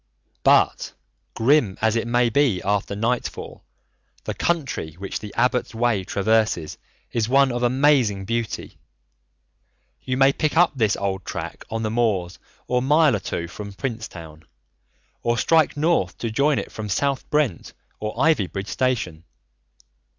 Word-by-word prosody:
But - - +3 0.4
grim 115 -4 +3
as 110 0 +2
it 115 0 -1
may 120 0 +2
be 130 -8 +2
after 100 0 0
nightfall, 115 +4 -3 0.6
the - - -3
country 140 - -2
which 95 +2 -5
the 105 -1 -8
Abbot's 125 0 +1
Way 115 -4 +1
traverses 100 -4 0 0.3
is 115 -1 -1
one 135 0 +4
of 120 0 -2
amazing 125 -6 +2
beauty. 115 0 -4 1.2
You 130 -1 -2
may 135 +1 +5
pick 155 +1 -1
up 175 0 +5
this 110 -5 +2
old 95 -1 -2
track - - -6
on 115 0 -3
the 110 - -1
moors 105 -7 0 0.3
a 125 0 +1
mile 145 0 +4
or - - -1
two 85 -2 -4
from 100 +3 -8
Princetown, 90 - -6 0.8
or 120 0 0
strike 160 0 +3
north 150 - +1
to 115 - -3
join 140 +5 +2
it - - -4
from 105 -1 -6
South 140 +6 -1
Brent 145 - 0 0.3
or 105 0 -4
Ivybridge 105 - +1
station. 115 -11 -1
115 Hz, 145 wpm, -23 LUFS, 100-135 Hz, 1.2 s, may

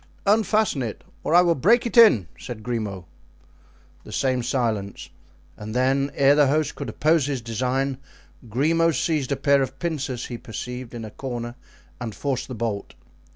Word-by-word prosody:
"Unfasten 215 -6 +2
it, 115 -4 -5 0.2
or 165 - +1
I 175 - +9
will 170 -1 +3
break 210 - +3
it 235 - -3
in!" 215 - +7
said 115 -3 -8
Grimaud. 105 -6 -3 1.0
The - - -11
same 130 -2 0
silence, 110 -6 -2 0.4
and 110 +2 -7
then, 135 +2 +2
ere 140 0 +5
the 145 -1 +4
host 150 +1 +1
could 140 -5 -6
oppose 155 +4 +2
his 140 -3 -1
design, 130 +3 -1 0.5
Grimaud 165 +7 +2
seized 150 -1 0
a - - +2
pair 140 0 +3
of 130 -1 -3
pincers 145 -7 -3
he 120 -2 -6
perceived 125 +2 -7
in 115 -2 -6
a 110 - -9
corner 120 -2 -5 0.5
and 115 -4 -5
forced 135 -3 -2
the 130 - -6
bolt. 110 -3 -4
130 Hz, 165 wpm, -24 LUFS, 120-150 Hz, 1.0 s, I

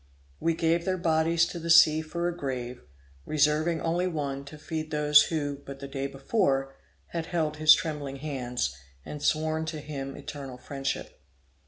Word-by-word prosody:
We 165 -1 +1
gave 165 +1 +1
their 185 +1 0
bodies 165 0 +2
to 170 - -6
the 170 0 -5
sea 160 -1 +7
for 170 +2 -3
a 175 - -2
grave, 125 -5 -4 0.4
reserving 155 - +2
only 175 +2 0
one 140 -5 -3
to 150 +2 -10
feed 155 +1 -5
those 150 -1 +5
who, 145 -3 -2
but 140 0 -9
the 140 - -6
day 135 0 -3
before, 135 -1 0 0.4
had 165 -1 -4
held 155 -3 -1
his 155 0 +8
trembling 145 -4 -4
hands, 125 - -3 0.3
and 150 - -7
sworn 155 +1 +1
to 160 -1 -4
him 140 -2 -6
eternal 135 -3 -7
friendship. 135 - -5
150 Hz, 165 wpm, -28 LUFS, 140-160 Hz, 0.4 s, his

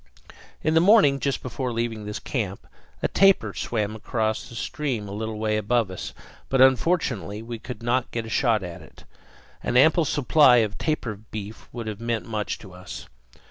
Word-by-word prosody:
In 155 - +2
the 160 - +6
morning, 175 -7 +5
just 140 -1 -1
before 130 0 -3
leaving 115 -2 -2
this 105 0 -4
camp, 100 -7 -4 0.4
a - - +4
tapir 195 - +4
swam 110 -2 -2
across 110 0 -1 0.2
stream 125 -6 -3
a - - -7
little 110 +1 -4
way 110 0 0
above 110 -1 +1
us; 95 - -6 0.4
but 135 - +1
unfortunately 130 - +2
we 115 0 -6
could 125 0 -8
not 120 +1 +1
get 115 -1 -3
a - - -8
shot 110 -2 +2
at 85 -2 -7
it. - - -16 0.6
An 125 - 0
ample 160 +5 +5
supply 145 -1 +5
of 105 -1 -7
tapir 125 -9 -2
beef 105 +1 -8
would 120 -2 -6
have 110 0 -5
meant 115 -1 -2
much 105 -2 -2
to 95 -4 -13
us. 90 +1 -9
115 Hz, 180 wpm, -25 LUFS, 105-130 Hz, 0.6 s, the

